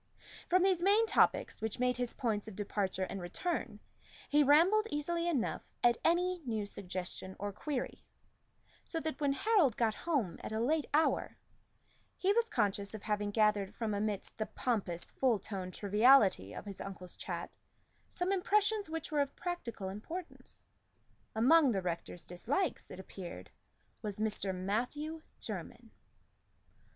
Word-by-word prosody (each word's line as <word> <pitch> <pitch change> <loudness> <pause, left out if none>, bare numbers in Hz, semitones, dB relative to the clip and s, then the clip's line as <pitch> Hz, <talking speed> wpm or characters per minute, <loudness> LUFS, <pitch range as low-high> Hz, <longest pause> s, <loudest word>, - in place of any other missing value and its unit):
From 365 +1 +5
these 375 -3 +3
main 410 +5 +5
topics, - - +2
which 220 -1 -2
made 250 0 +2
his 245 -1 -2
points 220 -4 -1
of 215 - -8
departure 200 -2 -1
and 190 0 -4
return, 260 - -3 0.5
he 295 +1 +4
rambled 350 +10 +5
easily 335 +4 -1
enough 280 -9 0 0.2
at 240 -1 +5
any 355 +1 +2
new 220 -5 -2
suggestion 185 -1 -5
or 205 0 -3
query; 275 +4 -4 0.8
so 330 - -3
that 315 -1 -4
when 280 -1 +3
Harold 330 - +3
got 225 -2 +2
home 250 - -1
at - - -5
a 220 - -1
late 295 +6 +1
hour, 310 +2 +2 0.8
he 390 +2 +3
was 465 +1 +2
conscious 200 -2 0
of 215 - -8
having 210 -1 0
gathered 210 -1 +2
from 220 -3 -2
amidst 205 0 -2
the 215 - -1
pompous 195 -8 -1
full 250 -4 +1
toned 190 -2 -6
triviality 210 - +5
of - - -7
his 200 -2 -7
uncle's 185 -2 -7
chat - - -5 0.5
some 360 +1 -1
impressions, 415 +1 +2
which 325 -1 -4
were 295 -1 +3
of 280 -1 -2
practical 250 - -4
importance. 320 - -7 0.7
Among 275 +6 +6
the 200 -5 +1
rector's 170 -1 -4
dislikes, 245 - -1
it 185 - -9
appeared, 175 - -8 0.5
was 210 -2 -3
Mr. 210 -2 0
Matthew 245 +12 -2 0.2
Jermyn. - - -7
235 Hz, 145 wpm, -34 LUFS, 200-320 Hz, 0.8 s, Among